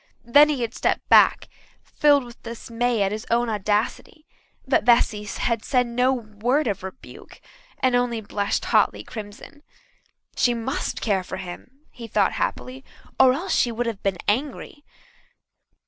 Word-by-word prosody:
Then 290 +5 +6
he 285 -4 -1
had 230 0 -4
stepped - - -1
back, - - +5 0.4
filled 290 -2 +3
with 240 -1 -14
dismay 235 -1 -2
at 195 - 0
his 215 +1 -6
own 240 0 +1
audacity. 215 - -2 0.4
But 265 - +2
Bessy 225 -3 +3
had 230 +2 -2
said 250 -2 +1
no 250 +2 +1
word 240 +4 -1
of 205 -3 -2
rebuke, 190 +6 -11 0.4
and 255 -1 +1
only 245 -2 0
blushed 205 -1 -2
hotly - - +2
crimson. 215 +6 -10 0.7
She 245 -1 +2
must 240 +5 -3
care 195 -4 0
for 190 - -7
him, 190 +9 -10
he 235 -2 -10
thought 205 -2 +1
happily, 260 +1 -4 0.4
or 260 -1 +6
else 345 +8 -3
she 240 - +2
would 235 +1 -2
have 225 -4 -4
been 195 -2 -1
angry. 280 +5 -2
235 Hz, 150 wpm, -23 LUFS, 210-255 Hz, 0.7 s, Then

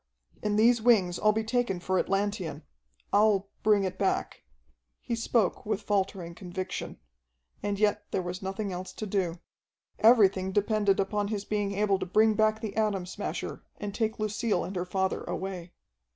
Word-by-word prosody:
"In 210 -1 0
these 230 +2 +4
wings 200 -7 +3
I'll 215 - +4
be 220 +1 -1
taken 230 -5 0
for 185 +1 0
Atlantean. 195 -3 -1 0.5
I'll 205 -1 +3
bring 210 -2 +4
it 185 0 -3
back." 195 - -1 0.6
He - - -5
spoke 230 -3 +1
with 210 -1 -2
faltering 195 -4 -1
conviction. 185 +1 -5 0.6
And 205 -1 -1
yet 210 -1 +2
there 185 - -1
was 180 +2 -5
nothing 195 +1 -3
else 180 +1 -6
to 215 - -5
do. 185 -4 -1 0.6
Everything 195 -5 +5
depended 205 -1 +2
upon 205 +1 0
his 205 -1 -3
being 205 -1 -1
able 200 -1 +1
to - - -3
bring 215 +4 +4
back 215 0 +2
the 220 -3 -5
Atom 210 -4 0
Smasher 180 - -5 0.2
and 205 -1 -5
take 220 0 -1
Lucille 215 -2 0
and 190 - -6
her 180 0 -1
father 190 +1 -1
away. 185 -2 -5
200 Hz, 165 wpm, -28 LUFS, 190-215 Hz, 0.6 s, Everything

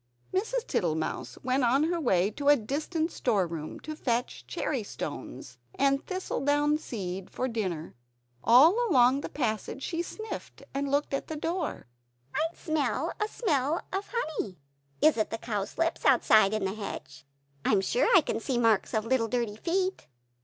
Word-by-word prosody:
Mrs. 450 +5 0
Tittlemouse 165 -9 -2
went 255 +1 +1
on 260 +5 +4
her 335 +1 0
way 195 - +2
to 285 +6 -4
a 290 - +8
distant 310 +7 -2
storeroom, 170 -9 -1
to 310 0 -6
fetch 245 -4 -2
cherrystones 145 - -4 0.2
and 275 0 +2
thistle 370 -6 -3
down 290 +1 +3
seed 190 -9 -5
for 255 - -2
dinner. 185 -9 -3 0.5
All 275 - +7
along 260 -2 +5
the - - -5
passage 240 0 -2
she 335 -1 -1
sniffed, 435 +5 -7
and 280 0 -1
looked 285 +1 0
at 275 - -2
the 315 - -4
floor. 335 +2 -3 0.5
"I - - 0
smell 310 -1 -1
a 425 - +2
smell 315 - 0
of 390 +1 -2
honey; 315 - -3 0.5
is 310 -4 +6
it 215 - +1
the 225 - -3
cowslips 225 +10 -2
outside, 220 -6 +5
in 210 -3 -1
the 190 - -1
hedge? 140 -10 -7 0.4
I - - +2
am 200 -3 +4
sure 485 - +2
I - - +7
can 225 - -2
see 265 - -3
the 240 - +2
marks 225 -2 +3
of 215 0 0
little 230 -1 +2
dirty 235 -3 -1
feet." 370 - -1
260 Hz, 165 wpm, -29 LUFS, 215-310 Hz, 0.5 s, a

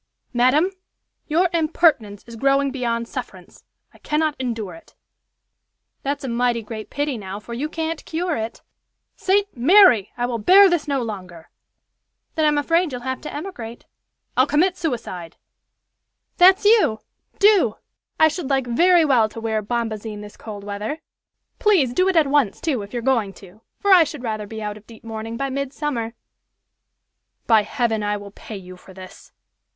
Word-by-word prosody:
"Madam, 260 +9 +3 0.6
your 335 +4 +2
impertinence 310 - +1
is 235 - -11
growing 275 +3 +2
beyond 235 -3 -2
sufferance. - - -9 0.3
I - - -20
cannot 305 0 0
endure 225 -7 -3
it." 165 - -16 1.1
"That's 280 +1 -3
a - - -3
mighty 240 -1 0
great 215 0 -8
pity, 285 -4 -2
now, 195 0 -6
for 225 +3 -9
you 280 +6 -3
can't 325 0 -4
cure 340 +1 -2
it." 225 0 -5 0.5
"St. 400 +1 0
Mary! 260 - +5
I 245 - 0
will 240 -2 -3
bear 380 - +7
this 335 -3 0
no 275 -3 0
longer." 185 -7 -8 0.8
"Then 315 - +1
I'm 300 -1 +3
afraid 330 +3 +1
you'll 250 -1 -5
have 260 0 -3
to - - -7
emigrate!" 245 -9 -7 0.5
"I'll 255 +2 +4
commit 350 +6 +2
suicide." 225 - -5 1.0
"That's 375 +3 +6
you! 415 - +4 0.4
Do! 395 - +4 0.4
I 315 - +7
should 315 -2 -4
like 270 -2 +1
very 340 +8 +4
well 240 -7 +3
to 225 - -9
wear 220 -1 -1
bombazine 220 -1 -4
this 205 0 -11
cold 205 -2 -9
weather. 205 +8 -4 0.6
Please 355 - +3
do 370 +7 +2
it 380 - 0
at 320 -2 +5
once, 275 -7 +1
too, 280 -9 -1
if 200 0 -9
you're 240 -2 -4
going 230 -7 +1
to, 195 +3 -16 0.2
for 405 - 0
I 355 -3 +8
should 290 -4 -7
rather 215 -3 -3
be 220 +1 -7
out 210 0 -4
of 215 - -18
deep 225 -1 -15
mourning 225 0 -6
by 275 +1 -2
midsummer!" 270 -4 -3 1.3
"By 225 -2 +5
heaven, 225 0 -1
I 205 0 -1
will 200 0 -10
pay 210 +1 -9
you 185 -1 -11
for 190 +1 -16
this." 185 -1 -13
245 Hz, 165 wpm, -22 LUFS, 220-310 Hz, 1.3 s, I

